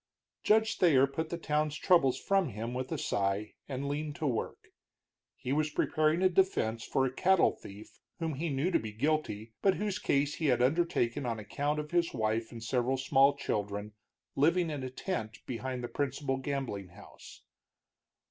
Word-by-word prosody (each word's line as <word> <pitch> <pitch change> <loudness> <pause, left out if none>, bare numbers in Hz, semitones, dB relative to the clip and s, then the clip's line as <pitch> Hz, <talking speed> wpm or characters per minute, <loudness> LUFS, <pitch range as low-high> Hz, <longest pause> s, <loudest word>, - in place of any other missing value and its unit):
Judge 220 +1 +3
Thayer 145 -7 +6
put 160 +4 -4
the 170 - -3
town's 150 -2 0
troubles 160 -9 +4
from 195 -5 +1
him 115 +2 -5
with 130 +1 -4
a 160 - -1
sigh 100 -4 -1 0.2
and 135 +1 -3
leaned 145 +1 -3
to 155 - -4
his 135 - +2
work. - - -5 0.7
He 130 +1 -3
was 155 +1 +1
preparing 155 +3 +1
a - - +7
defense 170 -12 +1
for 135 - +1
a 130 - -2
cattle 185 +5 +4
thief 100 +2 -13 0.2
whom 165 -2 -2
he 160 +5 -2
knew 145 +6 0
to - - +3
be 110 -1 -6
guilty, 115 -4 -1
but 195 -1 +4
whose 205 -2 -2
case 140 +1 +1
he 160 - -1
had 125 -3 +3
undertaken 135 -2 +1
on 115 -1 -1
account 145 +8 -2
of 150 0 -6
his 170 -3 +1
wife 110 0 -1
and 115 -2 -8
several 125 +3 0
small 135 +1 +4
children 105 -5 -3 0.4
living 165 +4 +3
in 145 -2 -4
a 130 - -4
tent 120 - -4
behind 125 0 -4
the - - -2
principal 140 0 -2
gambling 135 -8 -3
house. 90 +4 -14
140 Hz, 180 wpm, -31 LUFS, 115-155 Hz, 0.7 s, a